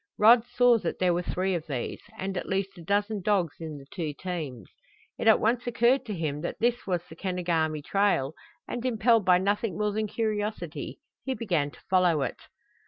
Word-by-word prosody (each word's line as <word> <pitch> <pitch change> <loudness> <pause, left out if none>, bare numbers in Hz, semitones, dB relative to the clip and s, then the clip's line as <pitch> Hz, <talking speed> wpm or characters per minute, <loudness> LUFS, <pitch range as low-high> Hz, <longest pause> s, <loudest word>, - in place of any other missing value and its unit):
Rod 225 +2 +7
saw 245 -2 +4
that 175 - -3
there 180 -1 +2
were 175 - 0
three 185 +2 -1
of 170 -2 -3
these, 130 -5 -4 0.2
and 190 0 -3
at - - -4
least 195 0 -1
a 175 - -11
dozen 205 +3 0
dogs 185 -6 +1
in 160 -3 -6
the 135 - -12
two 160 -5 -3
teams. 155 - -5 0.5
It - - -1
at 220 - +7
once 240 +3 +1
occurred 240 +2 +2
to 210 - -3
him 150 -3 -2
that 170 - -4
this 240 0 0
was 175 -3 0
the 160 - -11
Kenogami 165 -4 -1
trail, 195 -7 +1 0.3
and 240 - -4
impelled 230 -3 +3
by 180 -1 +6
nothing 200 +1 0
more 210 0 +1
than 215 +1 -1
curiosity 215 -1 -3 0.3
he 265 -1 -2
began 175 -11 0
to - - -17
follow 180 -6 +3
it. - - -4
190 Hz, 195 wpm, -28 LUFS, 165-220 Hz, 0.5 s, Rod